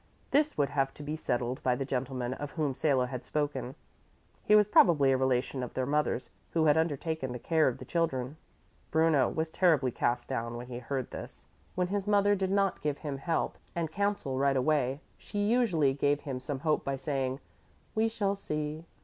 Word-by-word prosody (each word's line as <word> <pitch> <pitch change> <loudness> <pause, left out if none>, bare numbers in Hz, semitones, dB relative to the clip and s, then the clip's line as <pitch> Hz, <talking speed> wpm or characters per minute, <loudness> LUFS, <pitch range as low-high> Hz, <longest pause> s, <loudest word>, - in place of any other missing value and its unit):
This 300 +1 +2
would 145 -2 +2
have 135 -1 0
to 150 - -9
be 150 +2 -3
settled 125 -4 -2
by 125 -1 +2
the 135 - -3
gentleman 130 -1 -2
of 145 +2 -5
whom 150 -5 0
Salo 130 -2 +2
had 125 0 -6
spoken. 135 -4 -2 0.7
He 210 - +5
was 210 -1 +6
probably 150 -9 +5
a - - +4
relation 130 0 0
of 125 - -6
their 130 - 0
mother's 150 +2 0 0.2
who 160 -1 +3
had 150 -1 +5
undertaken 160 -3 -1
the - - -4
care 160 +5 +2
of 125 - 0
the - - -9
children. 145 -5 -1 0.5
Bruno 160 -5 +3
was 160 0 -2
terribly 155 -9 +3
cast 120 +1 -1
down 115 -2 -3
when 120 - -6
he 120 -1 -5
heard 130 +1 -4
this. - - -8 0.3
When 180 -1 0
his 200 0 -2
mother 205 0 +4
did 190 -2 0
not 195 0 +1
give 150 -2 -1
him 145 -3 -5
help 165 +3 -1 0.2
and 165 -2 -2
counsel 200 -9 -1
right 140 -1 +3
away, 140 0 +1 0.2
she 205 - -8
usually 200 - +3
gave 145 +1 +1
him 135 -4 -4
some 130 +1 -4
hope 155 -1 +1
by 140 - -1
saying, 135 -1 -2 0.5
"We 220 +1 +2
shall 205 -3 0
see." 155 -3 -4
145 Hz, 195 wpm, -30 LUFS, 130-165 Hz, 0.7 s, was